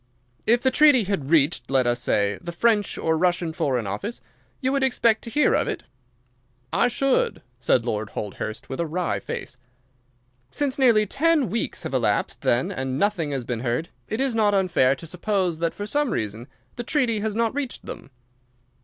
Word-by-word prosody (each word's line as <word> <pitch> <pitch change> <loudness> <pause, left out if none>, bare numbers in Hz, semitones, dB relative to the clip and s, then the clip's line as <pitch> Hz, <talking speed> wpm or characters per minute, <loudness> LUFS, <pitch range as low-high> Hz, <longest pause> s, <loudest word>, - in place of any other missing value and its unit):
"If 235 +2 +4
the 260 - +3
treaty 290 -3 +6
had 185 -9 -2
reached, 145 -6 +2
let 135 -2 +2
us 120 0 +1
say, 100 -3 +1
the 170 - -5
French 210 +3 +1
or 160 0 +1
Russian 175 -1 +1
Foreign 130 -7 -1
Office, 105 - -4 0.4
you 260 0 0
would 275 0 +1
expect 235 -4 +3
to - - -6
hear 290 +4 +3
of - - +1
it?" - - -3 0.9
"I - - +3
should," 265 +2 0 0.2
said 120 -1 +2
Lord 110 -3 -2
Holdhurst, 110 +1 -5
with 135 - -6
a 170 - 0
wry 175 +3 -1
face. 125 - -6 0.9
"Since 285 - -1
nearly 230 -5 +5
ten 285 - +2
weeks 230 - -2
have - - -5
elapsed, - - 0
then, 120 +2 +1
and 130 0 -3
nothing 180 -3 0
has 135 -3 -3
been 120 -1 -3
heard, 120 +7 -2 0.2
it 220 - -3
is 270 -2 +1
not 210 -2 +3
unfair 165 -9 +3
to 165 - -11
suppose 180 0 -1
that 165 0 0
for 205 - -5
some 290 +5 0
reason 110 - -3 0.3
the 240 - -3
treaty 240 -5 +1
has 210 0 -2
not 230 0 +1
reached 280 -3 -4
them." - - -8
185 Hz, 185 wpm, -24 LUFS, -, 0.9 s, treaty